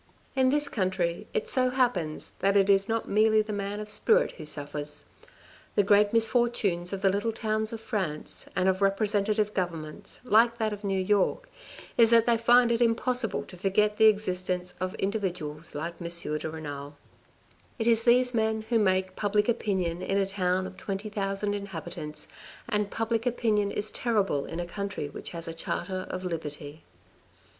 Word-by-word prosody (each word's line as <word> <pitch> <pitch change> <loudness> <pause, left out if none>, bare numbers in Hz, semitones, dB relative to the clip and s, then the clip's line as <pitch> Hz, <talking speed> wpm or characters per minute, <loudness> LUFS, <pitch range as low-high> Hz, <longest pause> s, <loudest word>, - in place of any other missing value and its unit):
In 260 -1 +4
this 295 +1 +1
country 185 -7 -1
it 460 0 -2
so 255 - +2
happens 240 -12 0
that 200 +1 +3
it 200 0 +4
is 195 +1 +3
not 225 0 -1
merely 215 +1 +4
the 215 0 -5
man 200 0 -3
of 210 - -6
spirit 445 - +3
who 155 -4 -10
suffers. 150 0 -4 0.7
The 205 - +4
great 205 +1 +4
misfortunes 225 -6 +1
of 195 0 -5
the 195 - +5
little 205 +4 0
towns 220 -1 -1
of 225 -1 -6
France 185 -10 -4
and 180 +1 +2
of 190 +1 +1
representative 210 +1 +1
governments, 165 -5 -4
like 235 +1 +4
that 220 -2 0
of 205 +1 -8
New 195 -1 0
York, 205 - +1 0.5
is 230 -1 +7
that 230 -1 +5
they 235 - +4
find 240 +1 +5
it 230 0 +1
impossible 240 0 +1
to - - -12
forget 210 +3 +1
the 220 - +7
existence 185 -3 0
of 185 0 -2
individuals 180 -6 -3
like 170 +4 -5
M. 170 - -3
de 160 -2 -2
Renal. 145 -2 -7 0.8
It 225 - -2
is 230 -1 +4
these 245 +1 +4
men 220 -1 0
who 235 -2 +3
make 185 -2 +1
public 210 0 +1
opinion 190 -7 -1
in 195 - -1
a 195 - +2
town 185 -1 0
of 185 - -9
twenty 200 +2 -4
thousand 200 0 -2
inhabitants, 175 -6 -6 0.4
and 210 -1 0
public 225 +2 -1
opinion 215 -4 +1
is 205 +1 -1
terrible 200 - 0
in 165 - -5
a 175 - -2
country 195 -4 -4
which - - -9
has 170 0 -5
a 165 - -4
charter 185 +3 -3
of 185 0 -5
liberty. 155 -3 -6
200 Hz, 175 wpm, -28 LUFS, 180-220 Hz, 0.8 s, is